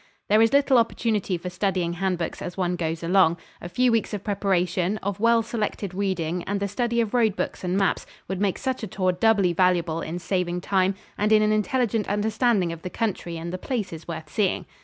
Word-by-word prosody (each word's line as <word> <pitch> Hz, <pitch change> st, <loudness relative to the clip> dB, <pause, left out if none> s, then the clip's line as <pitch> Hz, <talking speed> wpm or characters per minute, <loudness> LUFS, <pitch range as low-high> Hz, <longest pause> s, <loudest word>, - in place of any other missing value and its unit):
There 215 Hz, +2 st, +5 dB
is 225 Hz, 0 st, +4 dB
little 280 Hz, -2 st, +5 dB
opportunity 220 Hz, -5 st, 0 dB
for 180 Hz, +2 st, -6 dB
studying 180 Hz, -2 st, -1 dB
hand 185 Hz, 0 st, -1 dB
books 170 Hz, -1 st, -4 dB
as 175 Hz, -, -6 dB
one 180 Hz, -1 st, 0 dB
goes 165 Hz, -1 st, -3 dB
along. 170 Hz, -1 st, +4 dB, 0.2 s
A 175 Hz, -, -6 dB
few 250 Hz, +7 st, +2 dB
weeks 225 Hz, -2 st, 0 dB
of 200 Hz, -, -6 dB
preparation, 190 Hz, -1 st, 0 dB
of 200 Hz, 0 st, -2 dB
well 230 Hz, +1 st, +4 dB
selected 210 Hz, -4 st, -3 dB
reading 180 Hz, -3 st, -1 dB
and 200 Hz, 0 st, -1 dB
the 200 Hz, -, -1 dB
study 235 Hz, +3 st, -1 dB
of 225 Hz, -1 st, -2 dB
road 225 Hz, -5 st, +3 dB
books -, -, -3 dB
and 180 Hz, +1 st, 0 dB
maps 195 Hz, -2 st, 0 dB, 0.2 s
would 190 Hz, +1 st, -3 dB
make 200 Hz, -3 st, +1 dB
such 260 Hz, -1 st, -2 dB
a 220 Hz, -, -4 dB
tour 185 Hz, 0 st, 0 dB
doubly 195 Hz, -2 st, +3 dB
valuable 170 Hz, -2 st, +2 dB
in 165 Hz, +2 st, -4 dB
saving 180 Hz, -1 st, -1 dB
time 190 Hz, 0 st, +1 dB, 0.2 s
and 210 Hz, +1 st, +2 dB
in 215 Hz, 0 st, +6 dB
an 215 Hz, -, +2 dB
intelligent 220 Hz, 0 st, 0 dB
understanding 210 Hz, -2 st, +1 dB
of 165 Hz, -, -10 dB
the 180 Hz, -, -5 dB
country 180 Hz, -5 st, -3 dB
and 170 Hz, +2 st, -5 dB
the 185 Hz, -, -4 dB
places 195 Hz, -, -4 dB
worth 160 Hz, -3 st, -6 dB
seeing. 200 Hz, -4 st, 0 dB
195 Hz, 210 wpm, -25 LUFS, 175-215 Hz, 0.2 s, in